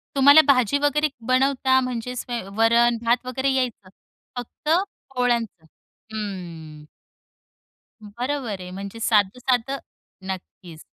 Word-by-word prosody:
तुम्हाला 285 Hz, +3 st, +8 dB
भाजी 255 Hz, -2 st, +4 dB
वगैरे 290 Hz, +1 st, +2 dB, 0.2 s
बनवता 260 Hz, 0 st, +3 dB
म्हणजेच 250 Hz, 0 st, -4 dB
स्वै 240 Hz, -1 st, -4 dB, 0.2 s
वरण 235 Hz, +1 st, +4 dB
भात 240 Hz, +2 st, +2 dB
वगैरे 265 Hz, +2 st, -1 dB
यायचं, 245 Hz, -7 st, -2 dB, 0.5 s
फक्त 245 Hz, +5 st, -6 dB, 0.5 s
पोळ्यांच? 240 Hz, -2 st, +1 dB, 0.7 s
हं. 170 Hz, -8 st, -7 dB, 1.2 s
बरोबर 235 Hz, 0 st, -4 dB
आहे. 180 Hz, -, -8 dB
म्हणजे 200 Hz, +4 st, -7 dB
साधं-साधं 245 Hz, +5 st, +1 dB, 0.5 s
नक्कीच. 180 Hz, -3 st, -8 dB
240 Hz, 100 wpm, -23 LUFS, 205-260 Hz, 1.2 s, तुम्हाला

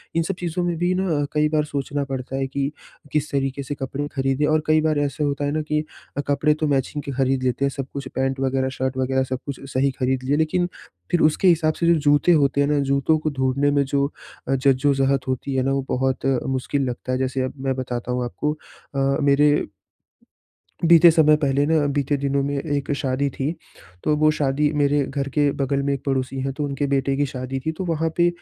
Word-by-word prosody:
इन 165 Hz, -, +2 dB
सब 195 Hz, +3 st, -3 dB
चीज़ों 175 Hz, 0 st, -2 dB
में 175 Hz, -1 st, 0 dB
भी 175 Hz, +2 st, +1 dB
ना 190 Hz, +1 st, 0 dB
अ, -, -, 0 dB
कई 150 Hz, 0 st, +2 dB
बार 155 Hz, -1 st, +1 dB
सोचना 145 Hz, 0 st, -3 dB
पड़ता 135 Hz, -1 st, -5 dB
है 135 Hz, 0 st, -1 dB
कि 140 Hz, +1 st, -2 dB, 0.4 s
किस 150 Hz, 0 st, -1 dB
तरीके 135 Hz, 0 st, -1 dB
से 145 Hz, +2 st, -5 dB
कपड़े 135 Hz, +1 st, -4 dB
ख़रीदें, 135 Hz, +2 st, +1 dB
और 155 Hz, 0 st, +2 dB
कई 155 Hz, 0 st, +4 dB
बार 155 Hz, -1 st, +1 dB
ऐसा 145 Hz, +1 st, -1 dB
होता 145 Hz, 0 st, -1 dB
है 145 Hz, -, 0 dB
ना 155 Hz, +1 st, -1 dB
कि 150 Hz, 0 st, -1 dB, 0.3 s
अ, -, -, +1 dB
कपड़े 145 Hz, +2 st, +2 dB
तो 155 Hz, 0 st, -2 dB
मैचिंग 140 Hz, +1 st, -1 dB
के 140 Hz, -, -5 dB
ख़रीद 130 Hz, 0 st, 0 dB
लेते 130 Hz, +2 st, +1 dB
हैं -, -, +2 dB
सब 135 Hz, 0 st, -5 dB
कुछ 140 Hz, -1 st, -5 dB
पैंट 135 Hz, 0 st, -1 dB
वगैरह 130 Hz, 0 st, 0 dB
शर्ट 130 Hz, 0 st, -2 dB
वगैरह 130 Hz, 0 st, +1 dB
सब 130 Hz, 0 st, -4 dB
कुछ 140 Hz, -2 st, -5 dB
सही 135 Hz, +1 st, +2 dB
ख़रीद 130 Hz, 0 st, 0 dB
लिए 140 Hz, +3 st, +1 dB
लेकिन 165 Hz, +3 st, +1 dB, 0.4 s
फिर 175 Hz, -, +2 dB
उसके 155 Hz, +5 st, +3 dB
हिसाब 160 Hz, -3 st, +4 dB
से 170 Hz, -, -2 dB
जो 170 Hz, -, +6 dB
जूते 145 Hz, +3 st, +3 dB
होते 140 Hz, -3 st, +3 dB
हैं 140 Hz, -, +2 dB
ना 150 Hz, -1 st, +2 dB
जूतों 140 Hz, +3 st, +3 dB
को 155 Hz, -, -1 dB
ढूँढने 135 Hz, 0 st, +1 dB
में 140 Hz, 0 st, +3 dB
जो 140 Hz, +1 st, +1 dB, 0.4 s
अ, 135 Hz, -, +2 dB
जज्जो-ज़हत 135 Hz, 0 st, +2 dB
होती 130 Hz, +1 st, -2 dB
है 130 Hz, -, +2 dB
ना 135 Hz, -, 0 dB
वो 135 Hz, -1 st, -1 dB
बहुत 130 Hz, +1 st, -1 dB
अ, 135 Hz, -2 st, +2 dB
मुश्क़िल 135 Hz, +2 st, -1 dB
लगता 125 Hz, +1 st, -5 dB
है 130 Hz, -, +1 dB
जैसे 130 Hz, 0 st, -1 dB
अब 130 Hz, -, -3 dB
मैं 130 Hz, -, +1 dB
बताता 125 Hz, -1 st, -4 dB
हूँ 125 Hz, 0 st, -1 dB
आपको। 150 Hz, +5 st, -2 dB, 0.4 s
अ, 135 Hz, 0 st, +1 dB
मेरे 145 Hz, +1 st, +3 dB, 1.2 s
बीते 170 Hz, 0 st, +8 dB
समय 155 Hz, -2 st, +5 dB
पहले 140 Hz, 0 st, +2 dB
ना 155 Hz, -1 st, +2 dB
बीते 145 Hz, 0 st, 0 dB
दिनों 140 Hz, 0 st, +1 dB
में 140 Hz, 0 st, -2 dB
एक 145 Hz, -1 st, -2 dB
शादी 135 Hz, +1 st, -1 dB
थी। 140 Hz, +3 st, -1 dB, 0.5 s
तो 150 Hz, -, +2 dB
वो 155 Hz, 0 st, +4 dB
शादी 145 Hz, +1 st, +1 dB
मेरे 145 Hz, 0 st, +3 dB
घर 140 Hz, -1 st, -3 dB
के 145 Hz, -1 st, +4 dB
बग़ल 140 Hz, +1 st, 0 dB
में 140 Hz, 0 st, 0 dB
एक 135 Hz, -, -5 dB
पड़ोसी 135 Hz, 0 st, -1 dB
है 135 Hz, +1 st, -2 dB
तो 150 Hz, -, -1 dB
उनके 140 Hz, 0 st, -2 dB
बेटे 135 Hz, 0 st, +1 dB
की 145 Hz, -, +2 dB
शादी 130 Hz, 0 st, -4 dB
थी। 160 Hz, -, +1 dB
तो 190 Hz, -, -3 dB
वहाँ 165 Hz, -1 st, 0 dB
पे 175 Hz, -, +5 dB
140 Hz, 230 wpm, -22 LUFS, 135-150 Hz, 1.2 s, बीते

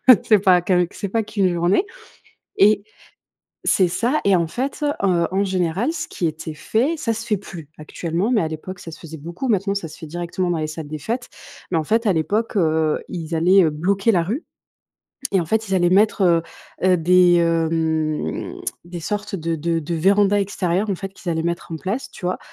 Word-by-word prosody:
heu, 255 Hz, -, +12 dB
c'est 215 Hz, -3 st, +5 dB
pas 180 Hz, -3 st, +5 dB
qu'avec 180 Hz, -1 st, +1 dB
c'est 200 Hz, -, -4 dB
pas 225 Hz, +4 st, 0 dB
qu'1 195 Hz, -3 st, 0 dB
journée! 175 Hz, -, +2 dB, 0.7 s
Et 205 Hz, 0 st, +5 dB, 0.8 s
c'est 185 Hz, -2 st, +3 dB
ça, 235 Hz, -, 0 dB
et 200 Hz, -1 st, +5 dB
en 170 Hz, -2 st, +1 dB
fait, 270 Hz, -, -3 dB, 0.2 s
heu, 175 Hz, -3 st, +2 dB
en 195 Hz, +1 st, +1 dB
général, 190 Hz, -, 0 dB
ce -, -, -4 dB
qui 175 Hz, -, -3 dB
était 155 Hz, 0 st, -5 dB
fait- 250 Hz, -, 0 dB
ça 230 Hz, -6 st, -1 dB
se 225 Hz, +1 st, -6 dB
fait 210 Hz, -3 st, +1 dB
plus, 170 Hz, -6 st, -10 dB
actuellement, 170 Hz, +7 st, -2 dB
mais 225 Hz, -, +3 dB
à 160 Hz, -, 0 dB
l'époque 170 Hz, +4 st, -7 dB
ça 170 Hz, -, -9 dB
se 155 Hz, -, -11 dB
faisait 160 Hz, -1 st, -9 dB
beaucoup, 170 Hz, -, -5 dB
maintenant 200 Hz, -1 st, +1 dB
ça 185 Hz, -5 st, -3 dB
se -, -, -12 dB
fait 160 Hz, -, -8 dB
directement 175 Hz, +2 st, -3 dB
dans 170 Hz, -, 0 dB
les 155 Hz, -, -2 dB
salles 155 Hz, -1 st, -7 dB
des 155 Hz, -, -5 dB
fêtes- 235 Hz, -, -3 dB, 0.4 s
mais 170 Hz, -, +2 dB
en 160 Hz, -, 0 dB
fait 225 Hz, +8 st, +1 dB
à 195 Hz, -, +4 dB
l'époque, 210 Hz, +9 st, -1 dB
heu, 160 Hz, -3 st, +1 dB
ils 170 Hz, -3 st, -5 dB
allaient, 180 Hz, +4 st, +5 dB
heu, 160 Hz, -, +3 dB
bloquer 195 Hz, +8 st, +1 dB
la 175 Hz, -5 st, +2 dB
rue 230 Hz, -, -3 dB, 0.9 s
et 195 Hz, -, +3 dB
en 165 Hz, -, -3 dB
fait 220 Hz, +4 st, 0 dB
ils 195 Hz, -, +1 dB
allaient 175 Hz, -1 st, +3 dB
mettre, 205 Hz, +1 st, +3 dB
heu 170 Hz, -2 st, +4 dB, 0.5 s
heu, 180 Hz, -, +4 dB
des, 180 Hz, +1 st, +5 dB
hem, 160 Hz, -, 0 dB, 0.3 s
des 175 Hz, 0 st, -7 dB
sortes 205 Hz, +2 st, -3 dB
de 165 Hz, -1 st, -2 dB
de 165 Hz, +1 st, -1 dB
de 165 Hz, +2 st, -3 dB
vérandas 200 Hz, +4 st, +3 dB
extérieures, 195 Hz, 0 st, -1 dB
en 195 Hz, -, 0 dB
fait, 195 Hz, +2 st, -6 dB
qu'ils 175 Hz, -3 st, -4 dB
allaient 160 Hz, 0 st, -1 dB
mettre 170 Hz, 0 st, -3 dB
en 160 Hz, -, -3 dB
place, 200 Hz, -, -3 dB
tu -, -, -8 dB
vois, 180 Hz, -, -1 dB
180 Hz, 215 wpm, -21 LUFS, 165-200 Hz, 0.9 s, heu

